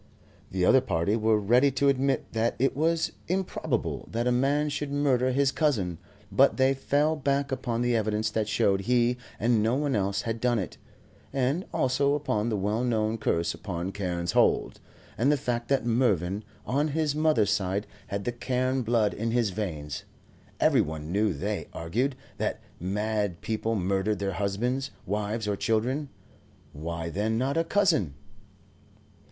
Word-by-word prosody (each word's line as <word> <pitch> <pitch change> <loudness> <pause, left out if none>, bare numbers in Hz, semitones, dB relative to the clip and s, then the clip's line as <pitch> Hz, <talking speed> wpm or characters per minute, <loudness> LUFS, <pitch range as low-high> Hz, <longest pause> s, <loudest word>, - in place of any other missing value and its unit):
The 90 -1 0
other 130 - +6
party 85 +1 0
were 110 -1 +3
ready 120 +7 +4
to 140 +1 +2
admit 135 -1 +1
that 115 +1 +1
it 135 +2 +1
was 165 +3 +1 0.2
improbable 190 +2 -2
that 115 +2 -1
a 125 - +3
man 140 +4 +2
should 145 0 -3
murder 135 -3 +2
his 135 +1 +2
cousin, 105 - 0 0.3
but 135 +8 +4
they 130 0 +4
fell 145 +3 +1
back 140 -1 0
upon 120 -3 -1
the 120 -1 +2
evidence 110 0 0
that 110 -1 -1
showed 100 -2 +2
he 120 +3 +2 0.2
and 115 0 +3
no 115 +3 +2
one 145 -2 0
else 100 -1 0
had 115 -1 -3
done 125 -1 +2
it, 95 -5 -4 0.5
and 135 +7 0
also 140 +2 +2
upon 115 -6 -1
the 110 - 0
well 105 +5 0
known 110 -2 0
curse 85 -5 0
upon 90 -1 -4
Carne's 90 -3 -2
Hold, - - +2 0.4
and 135 +6 +4
the 150 - +3
fact 120 -2 -2
that 135 -3 +1
Mervyn 105 -5 +1 0.2
on 140 +4 +1
his 155 -1 0
mother's 150 -10 +2
side 100 0 0 0.2
had 100 0 -3
the 120 - -1
Carne 130 +2 -1
blood 115 -3 +2
in 115 +2 -2
his 115 -3 +1
veins. 80 -8 -4 0.5
Every - - +4
one 80 +1 -5
knew, 105 +2 +2
they 70 -5 -3
argued, 120 +12 -1 0.2
that - - -1 0.2
mad 105 0 -1
people 110 +1 -1
murder 95 +2 0
their 100 -1 -2
husbands, 120 +8 -1 0.2
wives, 105 +2 -2
or 105 - +1
children; 125 +8 0 0.6
why, 85 +2 -4
then, 105 +6 -1
not 135 +4 0
a 165 - +2
cousin? 165 - +2
115 Hz, 165 wpm, -27 LUFS, 100-135 Hz, 0.6 s, other